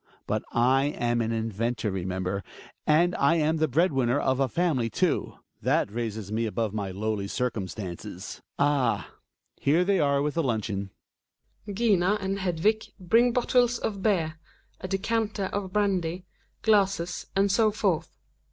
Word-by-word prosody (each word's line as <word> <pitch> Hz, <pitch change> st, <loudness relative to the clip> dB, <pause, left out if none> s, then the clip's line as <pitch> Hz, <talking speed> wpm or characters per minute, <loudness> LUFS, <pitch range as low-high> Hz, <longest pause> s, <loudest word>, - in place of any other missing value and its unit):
But, -, -, -1 dB
I 130 Hz, +3 st, +3 dB
am 120 Hz, -5 st, 0 dB
an 115 Hz, 0 st, -1 dB
inventor, 115 Hz, 0 st, -1 dB
remember, 95 Hz, +1 st, -2 dB, 0.4 s
and 170 Hz, +4 st, +4 dB
I 140 Hz, +4 st, +4 dB
am 160 Hz, 0 st, +2 dB
the 155 Hz, 0 st, +2 dB
bread 160 Hz, +5 st, +2 dB
winner 130 Hz, 0 st, +2 dB
of 130 Hz, 0 st, +1 dB
a 135 Hz, -, +3 dB
family 135 Hz, -5 st, 0 dB
too. -, -, 0 dB, 0.3 s
^hafr -, -, +2 dB
raiseff 110 Hz, -3 st, -4 dB
"me 115 Hz, +1 st, 0 dB
abova 110 Hz, -1 st, -2 dB
my 100 Hz, -3 st, -2 dB
lowly^i 100 Hz, 0 st, -3 dB
rou 125 Hz, -4 st, 0 dB
i»»tftBce& 95 Hz, -1 st, -7 dB
— -, -, -60 dB
' -, -, -61 dB
— -, -, -52 dB
Ah 140 Hz, -4 st, +1 dB
I -, -, -36 dB
here 165 Hz, +6 st, +3 dB
they 195 Hz, -1 st, +2 dB
are 140 Hz, -1 st, +2 dB
with 150 Hz, 0 st, -1 dB
the 170 Hz, -, +1 dB
luncheon 110 Hz, -7 st, -2 dB, 0.8 s
I 205 Hz, -, -4 dB
GiNA 205 Hz, -2 st, +3 dB
and 195 Hz, 0 st, -2 dB
Hedvig 190 Hz, +4 st, 0 dB
bring 230 Hz, +7 st, +4 dB
bottles 245 Hz, 0 st, +2 dB
of 200 Hz, -4 st, -3 dB
beer, 165 Hz, -7 st, 0 dB, 0.4 s
a 185 Hz, -, -5 dB
decanter 205 Hz, +1 st, -1 dB
of 200 Hz, -2 st, -3 dB
brandy, 185 Hz, -3 st, 0 dB, 0.4 s
glassies 195 Hz, -5 st, +2 dB
and 195 Hz, 0 st, +3 dB
so 215 Hz, +2 st, +4 dB
forth. 200 Hz, -6 st, -1 dB
150 Hz, 165 wpm, -27 LUFS, 115-195 Hz, 0.8 s, and